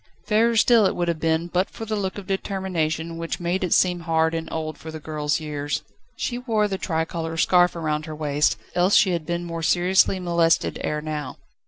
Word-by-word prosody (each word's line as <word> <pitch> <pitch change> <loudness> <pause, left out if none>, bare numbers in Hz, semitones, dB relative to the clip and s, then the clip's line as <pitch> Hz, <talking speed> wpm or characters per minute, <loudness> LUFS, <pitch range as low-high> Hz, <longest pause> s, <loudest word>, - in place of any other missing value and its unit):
Fairer 230 +2 +3
still 225 -2 +5
it - - -2
would 175 -1 -1
have 170 -2 -1
been, 160 +1 +1
but 180 +2 0
for 225 - -8
the 220 0 -2
look 195 -2 -3
of 200 - -7
determination 170 -4 -2
which 165 0 -4
made 175 +2 -1
it 180 - -1
seem 180 -1 +3
hard 160 -1 +1
and 165 0 -4
old 155 -1 -3
for 160 - -9
the 160 0 -7
girl's 150 -1 -2
years. 145 -2 -3 0.3
She 245 -1 -3
wore 220 -4 +1
the 190 -2 -3
tricolour 165 0 -2
scarf 175 +1 +4
round 155 -2 -2
her 155 - -6
waist, 150 -1 +1 0.2
else 180 +3 +3
she 190 - +5
had 170 -3 -2
been 175 0 -2
more 165 -1 -5
seriously 180 +3 +3
molested 170 -2 +1
ere 150 0 -1
now. 150 -3 -5
170 Hz, 205 wpm, -23 LUFS, 160-190 Hz, 0.3 s, still